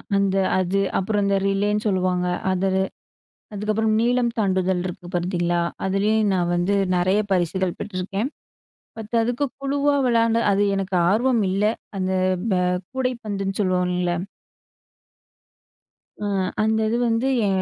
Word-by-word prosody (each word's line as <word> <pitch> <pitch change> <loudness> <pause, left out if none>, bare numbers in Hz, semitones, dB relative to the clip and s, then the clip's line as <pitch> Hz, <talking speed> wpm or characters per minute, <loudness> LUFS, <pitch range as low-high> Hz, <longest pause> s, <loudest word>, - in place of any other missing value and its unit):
அந்த 195 -1 +2 0.2
அது. 185 +2 0 0.2
அப்புறம் 205 +1 0
அந்த 200 0 +2
ரிலேன்னு 205 +2 0
சொல்லுவாங்க 185 -2 +1 0.2
அது, 190 +1 +1 0.8
அதுக்கப்புறம் 215 +2 0
நீளம் 240 0 +2
தாண்டுதல் 190 -2 +1
இருக்கு 180 0 -6
பார்த்தீங்களா? 175 -1 0 0.2
அதுலயும் 205 +2 +2
நான் 175 -1 0
வந்து 180 +3 +1 0.2
நெறைய 185 +4 +2
பரிசுகள் 185 0 0
பெற்றிருக்கேன். 195 +5 -3 0.7
பட் 220 +1 -8
அதுக்கு 245 +5 0 0.2
குழுவா 285 +1 +1
விளாண்ட 230 -1 +3
அது 200 +1 +2
எனக்கு 195 -1 -2
ஆர்வம் 235 +1 +2
இல்ல. 195 +2 0 0.3
அந்த 185 0 -1 0.4
ப-கூடைப்பந்துன்னு 195 +2 -2
சொல்லுவோம்ல்ல? 180 -2 +1 2.1
அ - - -1 0.4
அந்தது 220 +1 +1
வந்து, 230 +3 +1 0.2
ஏ - - +2
195 Hz, 110 wpm, -23 LUFS, 185-220 Hz, 2.1 s, விளாண்ட